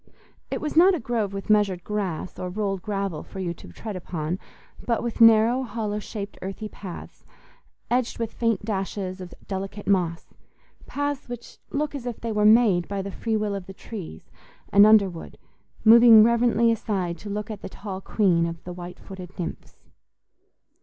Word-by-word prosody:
It - - -3
was 305 0 -3
not 365 +3 +7
a - - -3
grove 225 -4 -1
with 195 0 -6
measured 200 -4 +2
grass 195 -5 -3
or 180 - -3
rolled 195 0 -2
gravel 195 -5 -3
for - - -12
you 175 -2 -2
to - - -14
tread 205 - -7
upon, 175 -1 -4 0.4
but 235 -2 0
with 235 0 -3
narrow, 225 +3 +6
hollow 215 -3 -3
shaped, 205 -1 -7
earthy 195 +3 -5
paths, 190 -4 -10 0.7
edged 245 -1 +1
with 230 -1 -3
faint 230 -4 0
dashes 195 -2 -3
of 180 -1 -9
delicate 195 +1 -5
moss—paths 200 - -3
which 240 -1 -9
look 295 +1 -2
as 265 -4 -6
if 240 - -5
they 230 - -3
were 210 -1 +1
made 215 -5 +5
by 200 -1 -3
the 200 - -5
free 220 +2 -1
will 210 -1 -1
of 195 -2 -5
the 195 - -10
trees 185 - -9 0.4
and 200 +1 +8
underwood, 200 -6 +3 0.5
moving 230 -1 +9
reverently 235 0 +3
aside 195 -6 -2
to 210 - -8
look 210 +2 -4
at 210 - -7
the - - -7
tall 195 -1 -7
queen 180 -5 +2
of 165 -1 -7
the 180 - -7
white 175 0 -8
footed 190 -1 -10
nymphs. 175 - -7
205 Hz, 175 wpm, -25 LUFS, 185-230 Hz, 0.7 s, moving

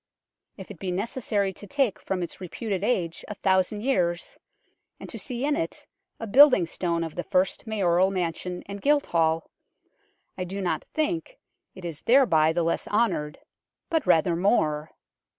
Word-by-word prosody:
If 190 0 -9
it 185 - -11
be 190 - -4
necessary 200 0 -1
to 205 - -11
take 260 -2 0
from 185 -2 -3
its 170 - -7
reputed 195 +1 -4
age 175 -8 -1
a 210 - -6
thousand 190 +2 +1
years, 180 -9 -1 0.6
and - - -8
to - - -7
see 250 +1 -3
in 295 0 +1
it 290 - -4 0.3
a - - -4
building 255 - +7
stone 170 0 -2
of 165 -2 -5
the 175 - -4
first 185 +4 0
Mayoral 190 -4 +2
mansion 180 -1 -3
and 200 0 -7
Guildhall, 170 - +1 0.9
I - - -1
do 190 +2 -5
not 185 -3 -2
think 330 +10 -1 0.4
it 185 - -10
is 165 -3 -6
thereby 195 - +4
the 170 +1 0
less 165 - -1
honoured, 205 -9 0 0.5
but 320 -3 0
rather 165 +1 +4
more. 155 -5 +1
190 Hz, 160 wpm, -26 LUFS, 170-230 Hz, 0.9 s, building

